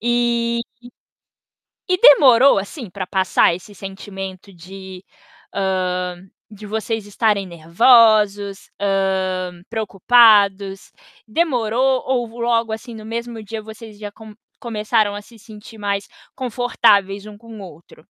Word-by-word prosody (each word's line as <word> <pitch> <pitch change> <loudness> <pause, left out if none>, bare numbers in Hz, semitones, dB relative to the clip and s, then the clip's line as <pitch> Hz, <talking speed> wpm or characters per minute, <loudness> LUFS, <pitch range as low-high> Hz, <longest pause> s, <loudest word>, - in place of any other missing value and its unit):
e 235 0 0 1.4
demorou 270 -3 +7
assim, 205 - -7
pra 185 0 -6
passar 190 -3 +2
esse 195 +4 -12
sentimento 195 0 -9
de 185 +1 -11 0.5
hã, 180 -2 -2 0.5
vocês 220 0 -3
estarem 205 -1 0
nervosos? 205 +3 +3
Hã, 190 -2 -1
preocupados? 205 -2 +3 0.3
Demorou? 255 -2 0
Ou 250 -2 0
logo 230 -1 0
assim, 230 +2 -7
no 215 -1 -10
mesmo 230 0 -6
dia 220 +1 -7
vocês 220 -1 -12
já 205 -1 -8
com 220 -1 -14 0.3
começaram 215 -2 -1
a 205 - -7
se 230 +2 -18
sentir 215 +1 -14
mais 200 -1 -3 0.3
confortáveis 205 -5 +1
um 210 -1 -12
com 225 0 -12
o - - -10
outro? 170 -3 -14
210 Hz, 115 wpm, -19 LUFS, 195-230 Hz, 1.4 s, demorou